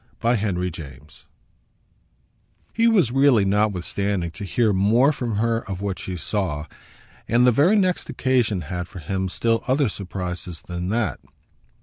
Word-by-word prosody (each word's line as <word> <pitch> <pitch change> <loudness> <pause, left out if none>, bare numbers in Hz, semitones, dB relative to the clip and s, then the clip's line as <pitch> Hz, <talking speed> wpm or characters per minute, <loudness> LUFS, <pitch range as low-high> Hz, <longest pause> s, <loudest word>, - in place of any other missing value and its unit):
Book 120 0 +2
Sixth, 100 -3 -1
Chapter 90 0 -1
3 75 -2 -10 1.7
He 230 +1 +3
was 190 - +3
really, 135 -6 +4
notwithstanding, 100 -2 0
to 95 - -8
hear 105 +2 +1
more 110 +9 +4
from 120 -6 -3
her 115 +2 +1
of 95 -2 -4
what 100 -2 -3
she 90 -1 -5
saw; 80 -3 -2 0.6
and 120 +2 +4
the 125 - +6
very 150 - +4
next 185 -4 +1
occasion 120 -7 +1
had 90 +2 -5
for - - -12
him 95 +3 -3
still 115 +4 0
other 135 -1 +2
surprises 90 -3 -6
than 90 0 -4
that. 115 +1 -1
100 Hz, 150 wpm, -23 LUFS, 90-120 Hz, 1.7 s, the